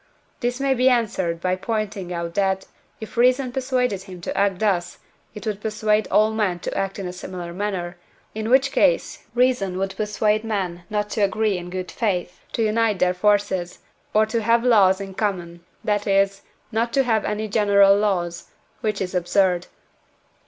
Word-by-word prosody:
This 245 +1 -2
may 275 -1 +2
be 255 0 +4
answered 190 -9 0
by 185 +1 0
pointing 200 -2 -3
out 170 -1 -4
that, 190 0 0 0.3
if 220 +1 -9
reason 250 +1 +3
persuaded 250 -6 0
him 185 -2 -10
to - - -4
act 200 -2 +2
thus, 180 -4 0 0.4
it 210 - -8
would 210 -2 -3
persuade 215 0 +1
all 215 +1 +4
men 210 -5 0
to - - -4
act 195 0 -2
in 195 - -5
a 180 - -6
similar 180 -1 -7
manner, 185 -2 -3 0.4
in 220 +1 -3
which 265 +2 +4
case - - +1
reason 245 -7 +2
would 195 0 -2
persuade 210 +1 0
men 185 -6 -3
not 210 0 -2
to 220 - -1
agree 210 +1 +1
in 175 0 -6
good 185 0 -5
faith 180 -5 -2
to 230 - 0
unite 220 -1 +2
their 180 0 +2
forces, 190 -2 +1 0.3
or 215 +1 +4
to 225 +1 -1
have 230 +2 +3
laws 200 -6 +5
in 195 -1 -7
common, 175 -4 -3 0.2
that 210 -1 0
is, 195 0 +2 0.3
not 230 +1 0
to 275 - +3
have 225 -4 +1
any 210 +1 -2
general 200 -2 +5
laws, 180 -5 -1 0.3
which 215 -4 -2
is 185 -1 -3
absurd. 180 0 +1
205 Hz, 175 wpm, -23 LUFS, 185-220 Hz, 0.4 s, laws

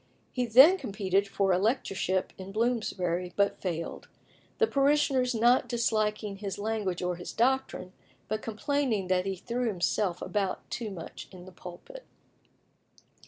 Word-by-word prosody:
He 250 -1 -1
then 275 +12 +8
competed 200 -4 0
for 195 -1 +1
a 180 - +2
lecturership 195 -4 0
in 190 0 -9
Bloomsbury, 190 -6 -1
but 200 0 +1
failed, 170 -3 -4 0.5
the 455 - +4
parishioners 275 - +2
not 240 +3 +4
disliking 215 -3 0
his 195 -1 -5
language 205 -4 -2
or 180 -1 -1
his 175 - -7
doctrine, 245 -6 0 0.3
but 215 +1 -2
complaining 225 -3 -1
that 185 0 +1
he 195 - -1
threw 240 +6 -2
himself 185 -2 0
about 200 -3 -2
too 230 -3 -3
much 175 -5 -8
in 180 -2 -12
the 185 - -11
pulpit. 185 - -11
210 Hz, 140 wpm, -29 LUFS, 185-240 Hz, 0.5 s, then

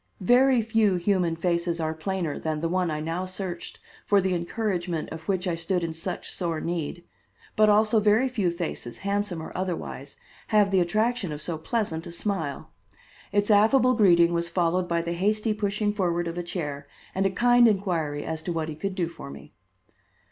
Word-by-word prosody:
Very 245 +4 +4
few 220 -3 +2
human 180 -2 +1
faces 170 0 -1
are 160 -1 -1
plainer 170 -1 -3
than 155 -1 -2
the 165 - -1
one 180 0 0
I 155 -1 -2
now 165 +4 -3
searched 185 -2 -6 0.3
for 205 - +5
the 190 -1 0
encouragement 175 -2 -2
of 160 0 -8
which 190 -1 0
I 175 - 0
stood 170 +2 -1
in 165 -1 -2
such 160 - -5
sore 170 -3 -1
need, 170 0 -3 0.5
but 215 0 +5
also 215 +1 +4
very 215 +5 +3
few 215 -8 0
faces, 170 -8 -5
handsome 200 -4 -1
or - - -9
otherwise, 170 -6 -4 0.3
have 210 -2 +3
the 190 - +4
attraction 215 +2 0
of 150 - -5
so 165 +2 -3
pleasant 165 -3 -2
a - - -7
smile. 170 -6 -3 0.6
Its 205 +1 +2
affable 245 +5 +5
greeting 175 -6 +5
was 170 0 -1
followed 180 +1 +1
by 170 -1 0
the 170 0 -2
hasty 215 +5 +1
pushing 210 0 -1
forward 175 -4 0
of 165 - -4
a 175 - -2
chair 150 -5 -5 0.3
and 195 +1 +2
a - - 0
kind 240 +4 +5
inquiry 170 -8 0
as 160 -1 -4
to 175 - -4
what 160 -1 -2
he 155 - -5
could 195 +4 -4
do 175 -3 0
for 165 -4 -10
me. - - -12
180 Hz, 190 wpm, -26 LUFS, 165-205 Hz, 0.6 s, for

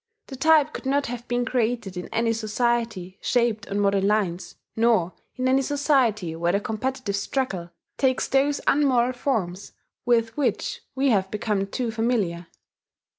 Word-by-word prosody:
The 270 - -6
type 305 +2 +4
could - - -6
not 280 +1 +1
have 240 0 -6
been 245 0 0
created 230 -5 -1
in 180 - -5
any 230 0 0
society 220 -4 -1
shaped 235 -2 +1
on 200 - -1
modern 200 -1 +2
lines, 195 -4 -1 0.2
nor 220 -6 +2 0.2
in 255 0 -1
any 265 +1 +4
society 255 - +1
where 170 +1 0
the 200 - +2
competitive 220 +1 -3
struggle 200 -5 -2 0.3
takes 260 -2 +2
those 280 +2 +2
unmoral 255 -4 +3
forms 205 -8 -2 0.3
with 230 -2 +2
which 290 - -1
we 270 +1 +2
have 190 -3 +1
become 210 -1 -1
too 235 +3 -2
familiar. 215 -7 -1
230 Hz, 150 wpm, -24 LUFS, 200-260 Hz, 0.3 s, type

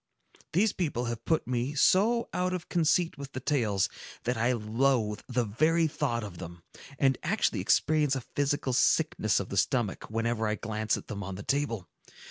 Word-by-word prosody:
These 200 +5 +3
people 145 -9 -2
have 120 -1 -5
put 160 - +1
me 125 +3 -2
so 220 +10 +3
out 180 0 0
of 180 -1 -7
conceit 170 -1 +1
with 140 0 -8
the - - -3
tales, 115 -9 +1 0.4
that 125 +1 0
I 115 +3 +2
loathe 115 -1 0
the 125 -1 +1
very 155 +10 +2
thought 140 -6 -1
of 95 -5 -8
them, 85 0 -9 0.3
and 135 -2 +2
actually - - 0
experience 150 -2 +2
a 135 - -2
physical 140 0 -1
sickness - - +2
of - - -5
the - - -4
stomach, 120 -7 0
whenever 115 0 -1
I 105 - 0
glance 110 0 -1
at - - -9
them 100 -2 -6
on 95 0 -5
the 100 - -7
table. 115 -9 -1
125 Hz, 180 wpm, -29 LUFS, 110-150 Hz, 0.4 s, These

